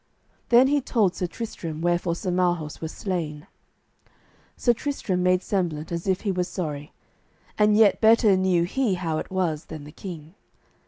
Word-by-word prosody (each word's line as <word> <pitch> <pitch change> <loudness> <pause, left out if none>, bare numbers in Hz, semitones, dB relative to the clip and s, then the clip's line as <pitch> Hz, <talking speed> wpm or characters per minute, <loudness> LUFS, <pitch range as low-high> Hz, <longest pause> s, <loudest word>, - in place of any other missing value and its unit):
Then 240 +2 +7
he 285 +1 +2
told 220 -8 +1
Sir 180 - -3
Tristram 170 -6 -6
wherefore 175 0 0
Sir 180 +1 -3
Marhaus 175 -4 0
was 160 0 -4
slain. 165 -5 -4 1.1
Sir 240 - +3
Tristram 220 -9 -2
made 180 0 +2
semblant 170 -6 -2
as 170 +2 -4
if 190 -1 +1
he 205 - -1
were 180 -1 0
sorry, 155 -5 -5 0.6
and 210 0 +4
yet 215 -3 +5
better 220 -2 +5
knew 185 -2 +2
he 210 +3 0
how 165 -3 -2
it - - -6
was 175 -5 -1
than 155 -2 -8
the 150 - -11
king. 165 -2 -9
180 Hz, 165 wpm, -25 LUFS, 165-205 Hz, 1.1 s, Then